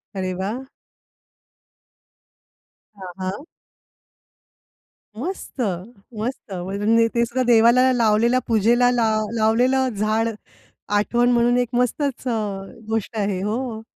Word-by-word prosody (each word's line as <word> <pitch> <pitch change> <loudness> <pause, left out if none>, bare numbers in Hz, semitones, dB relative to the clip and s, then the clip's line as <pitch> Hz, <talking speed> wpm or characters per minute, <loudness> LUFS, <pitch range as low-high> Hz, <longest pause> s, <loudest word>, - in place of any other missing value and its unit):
अरे 185 -1 -2
वाह! 220 +7 -3 2.4
हां, 185 -2 -8
हां. 190 +7 -4 1.8
मस्त, 330 -2 -5 0.6
मस्त. 225 -2 -5
म्हणजे 205 +5 +1
ते 235 0 +3
सुद्धा 245 +2 -1
देवाला 240 +2 +5
लावलेला, 235 +1 +3
पूजेला 235 +2 +3
लाव 220 -3 +1
लावलेलं 250 +4 +2
झाड, 215 +2 0 0.6
आठवण 240 +4 +2
म्हणून 240 0 +3
एक 245 -1 0
मस्तच 255 +2 -1 0.6
गोष्ट 225 0 -2
आहे. 200 -3 -1
हो. 220 +2 -3
230 Hz, 95 wpm, -22 LUFS, 210-245 Hz, 2.4 s, देवाला